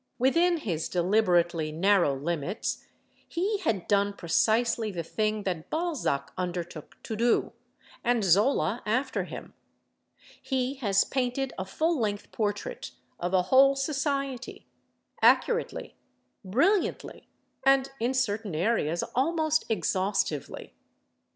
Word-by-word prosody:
Within 335 +8 +3
his 175 - -3
deliberately 175 -4 +2
narrow 175 -3 +3
limits 165 +6 -3 0.4
he 395 +5 -1
had 225 - -1
done 200 0 +2
precisely 220 +6 +1
the 175 -4 -4
thing 215 +4 -1
that 175 -5 -3
Balzac 310 - -1
undertook 175 -3 -5
to 220 - -4
do, 235 +2 +1 0.5
and 240 -2 +2
Zola 200 - +2
after 255 +5 0
him: - - -9 0.9
he 260 -1 -1
has 200 -6 +2
painted 260 0 -2
a 190 - -3
full 315 - 0
length 205 -3 -2
portrait 220 - -3 0.3
of 180 +2 -1
a 180 - +4
whole 270 +8 +5
society, 275 -2 -2 0.6
accurately, 475 0 +2 0.5
brilliantly 330 - 0 0.4
and, 270 0 +3
in 245 +3 0
certain 210 -7 -1
areas, 170 -3 0
almost 315 +3 +1
exhaustively. 190 - -1
220 Hz, 110 wpm, -28 LUFS, 180-270 Hz, 0.9 s, whole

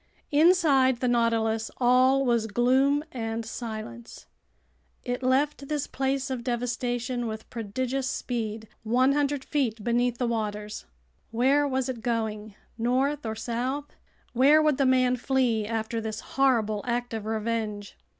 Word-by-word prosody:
Inside 290 -6 +4
the 250 - 0
Nautilus 225 -2 +1
all 255 +2 +4
was 235 -3 +1
gloom 260 +6 +2
and 225 -2 -4
silence. 230 +1 -7 0.8
It 245 0 -3
left 275 +2 +1
this 295 -1 -1
place 270 0 -2
of 250 -2 -3
devastation 245 0 -2
with 220 0 -6
prodigious 255 +4 -2
speed, 220 -4 -4
100 270 +4 +1
feet 235 -8 -1
beneath 240 +1 +1
the 250 - -1
waters. 210 -2 -3 0.4
Where 270 +5 +2
was 265 -1 -1
it 250 -3 -4
going? 220 -3 -3 0.2
North 260 +3 0
or 220 - -3
south? 250 +6 -3 0.4
Where 275 +5 +6
would 305 -3 +2
the 275 - +3
man 255 -1 +3
flee 245 -4 +1
after 225 0 -2
this 220 -1 -5
horrible 230 -6 +2
act 245 0 -2
of 220 -1 -4
revenge? 220 -2 -3
245 Hz, 130 wpm, -27 LUFS, 225-265 Hz, 0.8 s, Where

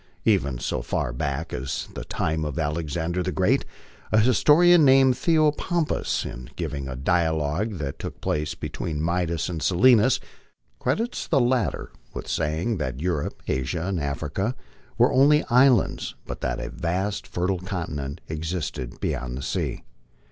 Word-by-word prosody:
Even 70 -2 +2
so - - -2
far - - -2
back 70 +6 -3
as 65 +2 -3
the - - -5
time 80 0 -1
of 75 -3 -4
Alexander 80 +3 -1
the 90 +1 -1
Great, 90 0 +2 0.5
a 110 - +5
historian 155 +9 +6
named 135 -1 +6
Theopompus, 155 +3 +1
in 60 +1 -7
giving 75 -5 -4
a 65 - -5
dialogue 80 - 0
that 70 -3 -5
took - - -6
place 75 0 -1
between 80 -3 -4
Midas 85 -1 0
and 85 -4 -4
Silenus, 120 +5 +5 0.6
credits 235 +3 -1
the 145 - +3
latter 125 -1 0 0.2
with - - -5
saying 80 +8 -1
that 65 -5 -3
Europe, 85 -3 -2
Asia, 65 +6 -1
and 95 -2 -1
Africa 75 - -2 0.4
were - - +4
only 145 +3 +5
islands, 125 -3 +3
but - - -7
that 60 -1 -1
a - - -5
vast 95 +4 -2
fer 90 - -2
tile 95 -1 0
continent 80 -7 -4
existed 80 -6 -4
beyond 65 -1 -3
the 70 - -5
sea. - - -2
85 Hz, 150 wpm, -25 LUFS, 75-115 Hz, 0.6 s, historian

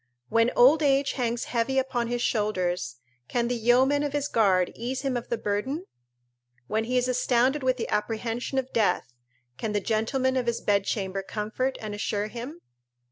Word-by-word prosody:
When 230 +1 +3
old 280 +6 +6
age 280 -1 +3
hangs 240 -2 -1
heavy 245 +3 -1
upon 260 -3 0
his 240 0 -1
shoulders, 180 - -1 0.3
can 235 - 0
the 245 - 0
yeomen 255 +5 +3
of 290 -1 -2
his 290 -1 0
guard 190 -7 +3
ease 250 +3 -4
him 270 -2 -1
of 240 - -3
the 235 - 0
burden? 225 - -2 0.8
When 220 - -1
he 250 +2 0
is 250 0 +2
astounded 255 +2 +2
with 255 -1 +1
the 235 - -3
apprehension 225 +4 -2
of 260 -1 -2
death, 180 - +1 0.5
can 215 - -2
the 205 - +2
gentlemen 255 +5 0
of 250 -2 -1
his 235 - 0
bedchamber 195 -1 0
comfort 215 +6 -3
and 215 -1 -5
assure 205 0 -2
him? 255 +9 -7
235 Hz, 175 wpm, -27 LUFS, 215-260 Hz, 0.8 s, old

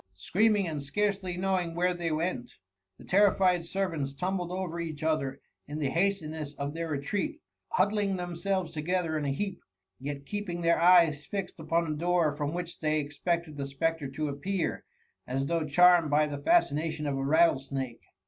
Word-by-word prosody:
Screaming, 205 - +2
and 155 -3 -3
scarcely 190 +4 -1
knowing 180 -3 0
where 180 +1 +2
they 170 -2 -2
went, 155 -5 -2 0.4
the - - -14
terrified 190 -3 +4
servants 165 -6 -2
tumbled 180 +2 -2
over 180 -2 -3
each 155 -3 -5
other 140 -4 0 0.3
in 145 +1 -5
the 140 -3 -1
hastiuess 160 -5 -1
of 140 +1 -4
their 165 0 -4
retreat, 155 - -2 0.3
huddling 205 - +2
themselves 180 0 -2
together 165 +1 -1
in 150 -2 -1
a 140 - 0
heap, 195 +7 -3 0.4
yet 140 +1 -5
keeping 180 -2 -4
their 170 0 +3
eyes 170 -4 +6
fixed 195 -4 -4
upon 165 +1 0
the 155 - -2
door 170 -2 +1
from 145 -1 -2
which 175 0 -5
they 155 -1 +1
expected 155 +2 -2
the 140 -1 -3
spectre 150 +2 -1
to 150 +3 -3
appear, 170 +7 -2 0.4
as 135 +2 -1
though 165 +1 0
charmed 175 +1 +6
by 150 +1 +4
the 145 -1 -5
fascination 160 - +2
of 140 -1 -1
a 135 - -2
rattlesnake. 135 -5 +1
165 Hz, 165 wpm, -29 LUFS, 145-180 Hz, 0.4 s, eyes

